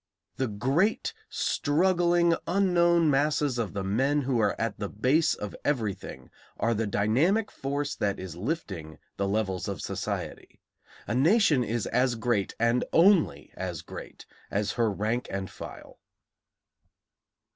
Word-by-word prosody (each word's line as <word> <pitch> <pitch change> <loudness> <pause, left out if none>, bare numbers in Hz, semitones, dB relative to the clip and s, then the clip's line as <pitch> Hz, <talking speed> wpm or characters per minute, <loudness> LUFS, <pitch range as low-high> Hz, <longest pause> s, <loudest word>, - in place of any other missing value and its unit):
The 130 - 0
great 140 - 0 0.2
struggling 175 +2 +2
unknown 175 -3 +3
masses 145 -2 +1
of 110 -4 -2
the 100 -1 -3
men 135 +9 +1
who 130 -2 0
are 105 -2 +1
at 110 -3 -2
the 100 -2 -3
base 130 +9 +2
of 105 - -6
everything 115 -9 -3 0.3
are 115 +2 +1
the 110 0 -1
dynamic 140 - +2
force 140 +1 -3
that 100 -1 -1
is 95 -3 -7
lifting 95 - -4 0.2
the 100 - 0
levels 100 -2 -1
of 100 -4 -4
society. - - -5 0.5
A 105 - -2
nation 150 - +4
is 115 -1 -2
as 125 -1 +1
great, 115 -4 -1
and 115 +2 +2
only 180 0 +3
as - - -5
great, - - -10 0.2
as 105 +1 -1
her 115 -2 +1
rank 110 +4 -2
and 95 -1 -4
file. - - -10
125 Hz, 135 wpm, -28 LUFS, 105-160 Hz, 0.5 s, nation